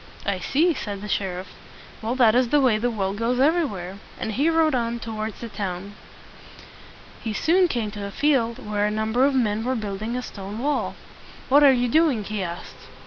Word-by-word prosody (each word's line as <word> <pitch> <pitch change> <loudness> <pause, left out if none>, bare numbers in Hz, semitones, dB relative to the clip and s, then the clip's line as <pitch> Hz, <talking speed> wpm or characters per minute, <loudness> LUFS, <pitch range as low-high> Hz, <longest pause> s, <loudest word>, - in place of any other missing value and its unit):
"I 195 -2 -1
see," 320 - +2
said 205 -7 -5
the 210 - -6
sheriff. 190 -2 -2 0.5
"Well, 225 +3 -2
that 235 -4 +5
is 250 0 +3
the 295 - +4
way 250 -6 +3
the 245 +2 +1
world 200 -3 -2
goes 235 +3 0
every 320 +5 +4
where." 190 -4 -6 0.2
And 220 - -3
he 280 +9 +2
rode 325 -2 +3
on 235 -1 0
toward 220 -1 -5
the 235 - -7
town. 200 -2 -5 1.3
He 220 - -3
soon 355 - +3
came 230 -9 -2
to 205 -1 -5
a - - -6
field 235 -1 +1
where 210 0 +1
a - - +1
number 220 +4 +1
of 280 -1 +2
men 220 -3 +1
were 255 +2 0
building 215 +1 -4
a 250 - -3
stone 200 -1 -7
wall. 285 +5 -1 0.5
"What 285 +3 +6
are 285 -2 +8
you 245 -1 +2
doing?" 285 -4 +3
he 210 0 -4
asked. 175 -1 -7
230 Hz, 200 wpm, -24 LUFS, 205-260 Hz, 1.3 s, are